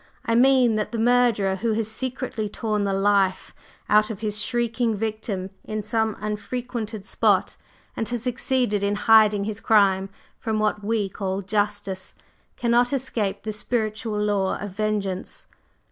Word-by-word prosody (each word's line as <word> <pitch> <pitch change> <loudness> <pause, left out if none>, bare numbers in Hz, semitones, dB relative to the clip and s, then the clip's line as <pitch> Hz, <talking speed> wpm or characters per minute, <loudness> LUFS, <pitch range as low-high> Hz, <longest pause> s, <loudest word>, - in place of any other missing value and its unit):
I 230 - +1
mean 250 -2 +4
that 210 - -2
the 235 - -3
murderer 225 -5 +3
who 225 +3 0
has 220 0 0
secretly 240 -1 -3
torn 210 -1 -1
the 195 - 0
life 195 -1 +1 0.3
out 210 0 +4
of 215 -2 -6
his 210 -1 0
shrieking 235 -1 0
victim 210 -3 -3
in 215 -1 -4
some 220 0 0
unfrequented 220 0 -4
spot, - - +2 0.4
and 225 -2 -2
has 240 -2 -3
succeeded 250 -4 0
in 200 +1 0
hiding 210 -1 +5
his 215 +1 -4
crime 195 -3 +3 0.3
from 220 -2 -2
what 210 -1 0
we 215 -1 0
call 195 0 -3
'justice,' 205 -2 -1 0.4
cannot 240 0 +2
escape 215 -7 -1
the 215 0 -3
Spiritual 215 -1 -2
law 205 -2 0
of 205 -1 -6
vengeance. 200 -2 -3
215 Hz, 145 wpm, -24 LUFS, 205-230 Hz, 0.4 s, hiding